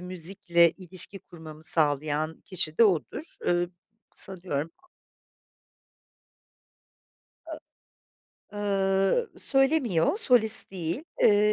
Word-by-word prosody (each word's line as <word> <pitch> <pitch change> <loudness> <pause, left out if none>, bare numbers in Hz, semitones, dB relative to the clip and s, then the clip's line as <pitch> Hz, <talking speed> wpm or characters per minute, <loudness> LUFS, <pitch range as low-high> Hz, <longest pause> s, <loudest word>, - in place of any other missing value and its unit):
müzikle 175 -1 +1
ilişki 185 +2 -13
kurmamı 160 -4 -14
sağlayan 155 0 +1
kişi 160 -4 -4
de 230 - +6
odur. 205 - -3
Iıı, 175 0 -1 0.4
sanıyorum 170 -5 -1 2.8
A - - -8 1.0
ııı, 195 - -1
söylemiyor, 270 - 0
solist 240 - +5
değil. 180 - -5 0.2
Iıı, 210 0 +3
185 Hz, 80 wpm, -25 LUFS, 160-205 Hz, 2.8 s, de